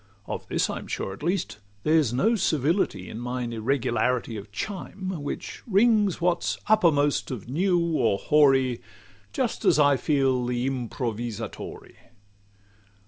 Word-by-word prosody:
Of - - -6
this - - +1
I'm - - -5
sure 95 - -3
at - - -12
least, 170 - -2 0.2
there's 155 -6 +3
no 195 - +2
servility 165 - 0
In 110 - -7
mine 125 -1 -3
irregularity 120 0 0
of 100 0 -8
chime, 190 - -5
Which 145 - -5
rings 210 -2 +3
what 175 0 +1
's - - -1
uppermost 150 -9 +3
of 120 -6 -6
new 175 +8 +1
or 155 -12 +1
hoary, 135 -1 +3 0.5
Just 255 -4 -2
as - - +4
I 145 -2 +5
feel 135 -3 +1
the 120 0 -1
'Improvvisatore. 120 -3 -4
140 Hz, 135 wpm, -26 LUFS, 120-170 Hz, 0.5 s, I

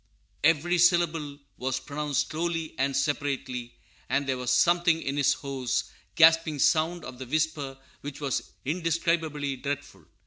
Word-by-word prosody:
"_ - - -44 0.4
Every 165 +3 +3
syllable 165 -4 +2 0.2
was 130 0 -1
pronounced 145 0 -2
slowly 165 0 -2
and 135 0 +1
separately; 135 -4 -2 0.3
and 140 - +1
there 135 -1 0
was 125 -1 -3
something 175 -1 +4
in 135 - -3
the 145 - 0 0.2
hoarse, 135 -3 -2 0.2
gasping 160 -1 +5
sound 165 +4 +2
of 125 -1 -9
the 130 - -7
whisper 150 -2 -1 0.2
which 145 0 -7
was 140 -3 -1 0.2
indescribably 160 -3 -1
dreadful. 140 - -5
145 Hz, 140 wpm, -27 LUFS, 135-165 Hz, 0.4 s, gasping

